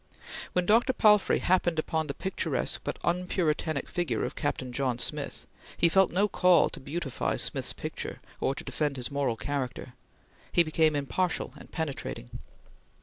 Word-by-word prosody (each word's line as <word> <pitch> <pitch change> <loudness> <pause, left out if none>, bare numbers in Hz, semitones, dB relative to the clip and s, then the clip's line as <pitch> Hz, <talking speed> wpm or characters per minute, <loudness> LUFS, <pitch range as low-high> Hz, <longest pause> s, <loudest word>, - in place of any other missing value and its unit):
When 180 0 +1
Dr. 230 +6 +4
Palfrey 210 -4 +5
happened 175 -3 +2
on 160 -1 0
the 140 - -4
picturesque 190 0 -1
but - - -3
unpuritanic 170 -4 0
figure 175 -1 -1
of - - -5
Captain 135 -4 -2
John 130 -1 -1
Smith, - - -2 0.3
he 170 - +6
felt 190 +2 +4
no 195 +4 +3
call 180 -3 +4
to - - -7
beautify 145 -1 -2
Smith's - - 0
picture - - -6 0.2
or 135 - 0
to - - -7
defend 145 -3 -2
his 125 +2 -3
moral 140 -4 0
character; 130 -1 -4 0.6
he 175 - +6
became 155 -1 +2
impartial 150 +4 -1
and - - -14
penetrating. 140 - -4
160 Hz, 150 wpm, -29 LUFS, 140-180 Hz, 0.6 s, he